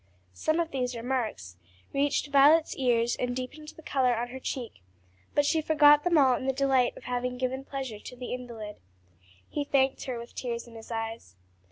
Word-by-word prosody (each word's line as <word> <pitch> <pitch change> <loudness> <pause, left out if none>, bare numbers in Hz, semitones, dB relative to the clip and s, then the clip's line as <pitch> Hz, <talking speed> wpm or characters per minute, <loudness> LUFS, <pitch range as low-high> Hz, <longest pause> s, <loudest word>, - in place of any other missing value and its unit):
Some 315 - 0
of 335 -1 -1
these 250 -2 -2
remarks 230 - -3 0.4
reached 285 +1 0
Violet's 295 +3 +5
ears 240 -2 +2
and 245 0 -2
deepened 260 +4 -6
the 320 - -14
color 255 -5 +2
on 240 +1 -2
her 260 +2 -7
cheek, 245 - -5 0.5
but 290 - +4
she 315 +2 +2
forgot 295 -1 +6
them 350 -2 +3
all 265 -3 +6
in 260 - -4
the 265 - +2
delight 265 -2 +2
of - - -12
having 250 0 -2
given 260 +1 -2
pleasure 265 -6 -5
to 250 - -10
the 250 0 -5
invalid. 235 -4 -7 0.7
He 295 - -2
thanked 270 -1 +1
her 255 -2 -3
with 235 +1 -9
tears 235 -2 -4
in 235 - -14
his 225 -1 -11
eyes. 225 - -5
255 Hz, 190 wpm, -28 LUFS, 240-280 Hz, 0.7 s, forgot